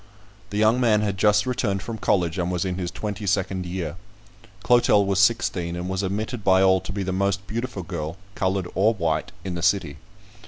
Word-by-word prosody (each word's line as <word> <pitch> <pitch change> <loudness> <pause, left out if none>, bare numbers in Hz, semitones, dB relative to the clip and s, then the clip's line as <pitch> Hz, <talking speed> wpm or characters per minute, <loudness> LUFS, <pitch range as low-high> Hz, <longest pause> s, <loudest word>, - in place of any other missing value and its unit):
The 105 - -4
young 110 +3 +4
man 110 -3 +3
had 105 -2 -1
just 105 +2 +3
returned 110 -6 -1
from 115 -2 -6
college, 90 -2 +1
and 90 0 -1
was 90 +1 -1
in 90 0 -3
his 90 -2 -2
twenty 105 +1 -5
second 95 -2 0
year. 85 -3 -4 0.7
Clotel 120 -4 +4
was 95 -1 +1
sixteen, 95 -5 +1
and 90 +1 -4
was 95 0 -1
admitted 105 +4 -3
by 95 -1 +4
all 95 -1 +4
to 95 - -6
be 100 -1 -3
the 95 - -2
most 100 +1 0
beautiful 115 -2 -4
girl, 80 0 -5 0.2
coloured 95 -2 -1
or 110 +4 +3
white, 85 -5 -1
in 95 - -3
the 85 - -4
city. 85 -5 +1
95 Hz, 200 wpm, -24 LUFS, 90-105 Hz, 0.7 s, young